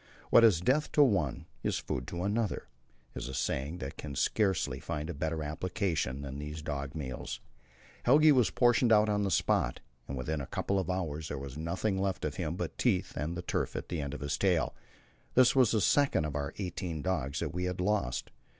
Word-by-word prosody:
"What 115 - +8
is 100 -8 +6
death 135 +10 +2
to 150 - +7
one 95 - +1 0.2
is - - 0
food 65 -1 -4
to 85 +1 -4
another," 105 +1 -1 0.5
is - - -5
a 65 - -5
saying 70 +5 -1
that 70 -6 -6
can 70 -2 -6
scarcely 95 - +1
find 75 +2 -4
a - - -5
better 80 +1 -2
application 75 -4 -2
than 70 0 -6
these 75 +1 -6
dog 70 -1 -4
meals. 65 -5 -5 0.6
Helge 150 +5 +6
was 125 -5 +4
portioned 120 -1 +3
out 105 0 +5
on 105 0 +1
the 100 - +1
spot, - - +1 0.3
and 65 - -4
within 75 +4 -2
a 65 - -6
couple 100 0 -1
of 95 - -3
hours 80 -4 -2
there 75 - -4
was 70 -1 -7
nothing 95 +5 -1
left 95 -3 -1
of 75 -2 -3
him 85 -2 -2
but 90 -2 -3
his - - -5
teeth 105 -8 +1
and 80 +4 -3
the 90 - -4
tuft - - -2
at - - -5
the 85 -3 -2
end 70 0 -4
of - - -8
his 70 0 -2
tail. 90 -6 +2 0.6
This 130 +1 +6
was 130 -4 +5
the 110 -1 +2
second 140 - +3
of 75 -2 -4
our 70 -1 -2
eighteen 90 -4 -4
dogs 75 -7 -1
that - - -3
we 90 +1 -1
had 90 0 -3
lost. 90 -10 0
85 Hz, 215 wpm, -31 LUFS, 75-100 Hz, 0.6 s, What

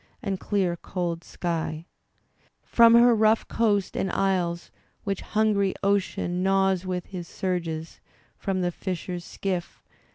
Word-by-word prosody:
And 195 -3 -2
dear 190 -4 0
cold 170 -2 -3
sky 165 -2 -3 0.4
— - - -38
From 230 0 +6
her 240 +1 +7
rough 220 0 +3
coast, 205 -4 +1
and 190 - -1
isles, 180 -3 0 0.3
which 200 -2 -2
hungry 210 -3 +1
Ocean 195 -2 0
Gnaws 190 -1 +2
with 180 -1 -2
his 180 -3 -7
surges 165 -4 -3 0.2
— - - -33
from 190 -1 -2
the 175 0 0
fisher's 180 -1 -4
skiff. 180 -1 -4
185 Hz, 135 wpm, -26 LUFS, 175-200 Hz, 0.4 s, her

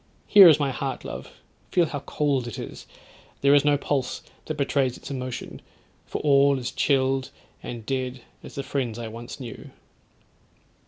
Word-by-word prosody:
Here 200 -3 +9
is 155 -2 +5
my 140 -2 +1
heart, 135 +1 -4
love, - - -7 0.4
feel 175 -2 +3
how 145 -2 -4
cold 140 -3 -1
it 120 - -6
is; - - -8 0.5
there 140 +1 +5
is 145 -1 +6
no 145 -1 +4
pulse 135 -2 -2 0.2
that 155 - -4
betrays 135 -3 +1
its - - -9
emotion; 130 -2 -5 0.5
for - - -4
all 140 -1 +5
is 125 -1 -4
chilled 135 -1 +1 0.3
and 115 -2 -7
dead 130 0 -3 0.2
as - - -11
the 140 - -3
friends 125 -5 -2
I 120 -1 -5
once 115 +4 -8
knew.' 120 -4 -8
135 Hz, 165 wpm, -25 LUFS, 125-145 Hz, 0.5 s, Here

